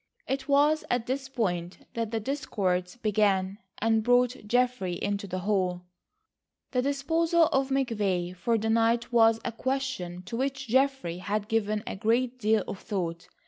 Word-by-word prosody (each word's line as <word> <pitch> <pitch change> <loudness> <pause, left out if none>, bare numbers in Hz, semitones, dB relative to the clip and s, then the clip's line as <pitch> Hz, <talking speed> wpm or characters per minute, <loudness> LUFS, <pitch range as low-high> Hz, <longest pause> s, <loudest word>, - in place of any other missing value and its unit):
It 265 0 -2
was 295 +2 +4
at 245 -2 0
this 265 +1 -3
point 180 -9 -2
that 230 -2 -2
the 225 0 -1
discords 195 -8 -1
began, 205 -4 +1 0.2
and 225 0 +2
brought 245 0 +2
Geoffrey 245 -5 +1
into 205 0 -2
the 185 0 -4
hall. 185 -3 0 0.9
The 250 - +1
disposal 325 +5 +2
of 270 0 +1
McVay 205 -9 0
for 230 +6 +1
the 220 +1 0
night 230 +1 +2
was 225 -1 +5
a - - -1
question 260 -8 -3
to 230 - -6
which 270 +1 -2
Geoffrey 260 -8 +1
had 205 +2 -2
given 215 -2 0
a - - -4
great 240 +5 0
deal 215 -2 +2
of 190 - -5
thought. 175 -6 -4
225 Hz, 155 wpm, -28 LUFS, 195-260 Hz, 0.9 s, was